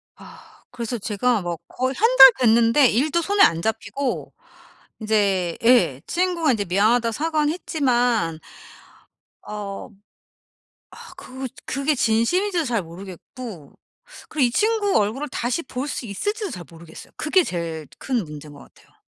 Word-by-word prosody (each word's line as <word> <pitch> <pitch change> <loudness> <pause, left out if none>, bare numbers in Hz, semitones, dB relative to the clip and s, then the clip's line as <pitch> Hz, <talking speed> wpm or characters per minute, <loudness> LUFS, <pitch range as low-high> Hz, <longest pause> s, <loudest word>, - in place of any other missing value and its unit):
아 - - -16
그래서 240 0 -4
제가 220 +2 0
막 175 -2 -4
거의 260 +1 -2
1 455 - +4
달 265 -1 +12
됐는데 235 +3 +4
일도 300 +8 +1
손에 400 +4 +1
안 165 0 +4
잡히고 250 +4 -3 0.7
인제 200 -5 0
예 230 - +4
친구가 345 -4 +1
인제 210 -5 -1
미안하다고 220 +6 +2
사과는 305 +2 0
했지만 245 - 0 1.1
어. 205 -2 -6 1.0
아 - - -13
그 260 0 -7 0.2
그게 275 +3 0
진심인지도 330 - +1
잘 235 -6 -1
모르겠고. 180 - -10 0.6
그리고 290 -5 +1
이 - - -1
친구 420 - +1
얼굴을 225 +9 -1
다시 250 +5 -2
볼 260 +2 -5
수 250 - -5
있을지도 410 - -3
잘 180 - -8
모르겠어요. 165 -1 -13
그게 360 +4 +2
제일 165 - -5
큰 250 -4 -1
문제인 150 -1 -10
것 145 - -14
같아요. - - -20
240 Hz, 285 characters per minute, -22 LUFS, 200-290 Hz, 1.1 s, 달